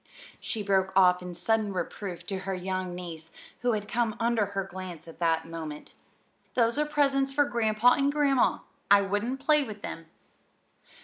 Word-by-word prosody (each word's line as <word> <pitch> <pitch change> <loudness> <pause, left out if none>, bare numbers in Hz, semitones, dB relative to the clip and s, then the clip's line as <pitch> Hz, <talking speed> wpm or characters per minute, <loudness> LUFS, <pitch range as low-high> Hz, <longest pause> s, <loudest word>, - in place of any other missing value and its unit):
she 220 -3 -4
broke 190 -1 +2
off 180 -1 +5
in 180 0 -6
sudden 215 +3 0
reproof 185 -1 -5
to 195 -1 -3
her 190 0 -3
young 185 0 -3
niece, 165 -2 -8 0.3
who 245 -1 +1
had 210 -1 -3
come 230 -1 0
under 230 -3 +2
her 200 -1 -2
glance 185 -3 -8
at 165 - -12
that 165 -1 +1
moment. 160 -2 -7 0.6
"Those 235 +2 +2
are 300 - +1
presents 275 -2 +2
for 290 +1 +3
Grandpa 235 -1 +3
and 280 0 +2
Grandma. 285 -3 +2 0.3
I 200 0 +7
wouldn't 205 +7 -1
play 300 +1 +4
with 215 -5 -8
them." 165 -1 -6
205 Hz, 170 wpm, -28 LUFS, 180-240 Hz, 0.6 s, I